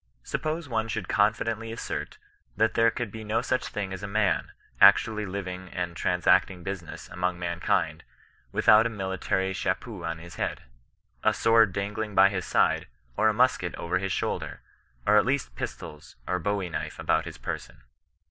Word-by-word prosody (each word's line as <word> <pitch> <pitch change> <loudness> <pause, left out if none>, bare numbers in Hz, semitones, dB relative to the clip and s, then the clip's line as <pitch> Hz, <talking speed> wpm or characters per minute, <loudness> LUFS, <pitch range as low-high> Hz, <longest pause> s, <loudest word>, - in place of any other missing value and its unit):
Suppose 155 +1 -3
one 110 -2 -1
should 110 -4 -3
confidently 115 +1 +1
assert 115 - -5 0.4
that 110 0 +3
there 115 0 +4
could 115 -2 -4
be 110 +1 -7
no 110 +2 0
such 130 0 0
thing 100 -2 -4
as 95 - -6
a 100 - -4
man, 105 -1 +1 0.3
actually 105 -2 +6
living 95 -1 -5
and 90 -1 -4
transact 90 +3 +3
ing 90 -2 -10
business 95 -3 -6
among 90 0 -1
mankind, 85 0 -1 0.5
without 110 +2 +5
a - - -4
military 95 -2 -1
cha - - 0
peau 105 -8 -9
on 85 0 -3
his 85 +1 -11
head, - - -2 0.6
a - - +3
sword 115 -3 +5
dangling 105 +2 -3
by 95 +1 +7
his 95 -2 -3
side, - - +2 0.3
or 110 - +4
a - - +1
musket 125 -7 +2
over 90 +2 -1
his 95 0 -2
shoulder, - - -2 0.4
or 105 - +5
at 105 - +6
least 130 - -1
pistols 75 -1 -7
or 90 0 0
bowie 100 0 -1
knife 85 - -4
about - - +1
his - - -8
person. - - -6
100 Hz, 175 wpm, -27 LUFS, 90-110 Hz, 0.6 s, by